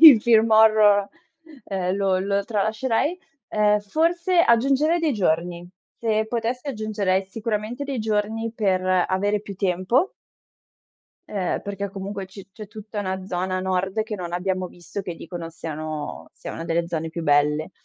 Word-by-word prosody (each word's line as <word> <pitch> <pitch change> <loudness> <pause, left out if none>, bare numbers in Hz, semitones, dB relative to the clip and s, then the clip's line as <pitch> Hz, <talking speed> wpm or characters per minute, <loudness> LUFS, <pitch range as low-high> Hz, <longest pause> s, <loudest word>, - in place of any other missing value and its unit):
il 290 -9 +11
film 225 -1 +4
horror, 215 -2 +6 0.6
ehm, 185 -1 -1
lo 195 -2 +2
lo 200 +1 0
tralascerei. 225 - 0 0.3
Ehm, 210 0 +3
forse 340 - +2
aggiungerei 275 +7 +3
dei 320 -4 +1
giorni. 175 -2 -1 0.3
Se 220 -1 +1
potessi, 240 +4 -2
aggiungerei 205 -6 -1
sicuramente 220 +5 -3
dei 275 -3 -3
giorni 220 +1 -1
per 190 -4 +1 0.2
avere 205 +2 0
più 200 -2 -8
tempo 190 - +1 1.2
ehm, 190 -4 -1
perché 200 -1 -4
comunque 195 0 -5
c 195 +1 -11
c'è 215 -1 -9
tutta 215 0 -7
una 190 -1 -3
zona 185 0 -1
nord 190 +3 0
che 215 -1 -5
non 175 -2 -6
abbiamo 185 +1 -1
visto, 175 +3 -7
che 175 -2 -5
dicono 165 0 -7
siano 155 -2 -6
sia - - -8
una 165 - -6
delle 170 0 0
zone 165 -1 -2
più 165 +1 -5
belle. 150 +2 +2
200 Hz, 150 wpm, -24 LUFS, 185-225 Hz, 1.2 s, il